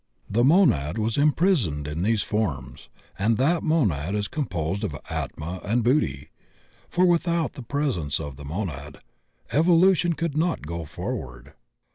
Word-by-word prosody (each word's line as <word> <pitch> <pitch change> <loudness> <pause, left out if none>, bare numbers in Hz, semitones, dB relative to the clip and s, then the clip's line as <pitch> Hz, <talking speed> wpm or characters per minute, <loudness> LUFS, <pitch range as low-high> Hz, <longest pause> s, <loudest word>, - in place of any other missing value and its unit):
The 115 +4 +1
monad 125 - +4
was 110 +1 0
imprisoned 145 - +2
in 75 +3 -3
these 105 +2 +1
forms, 85 - -3 0.3
and 110 +3 +2
that 160 +7 +2
monad 100 - +1
is 105 -1 -1
composed 95 - -3
of 75 - -3
Atma 85 +4 -4
and 115 +3 +1
Buddhi; 80 - +1 0.6
for, 180 +1 +3
without 170 -1 +1
the 140 - -8
presence 120 - -1
of 75 -4 -6
the 70 - -11
monad, 75 -3 -5 0.5
evolution 175 +2 +4
could 165 -2 -3
not 165 - 0
go 85 +1 -5
forward. 65 -2 -6
110 Hz, 140 wpm, -25 LUFS, -, 0.6 s, monad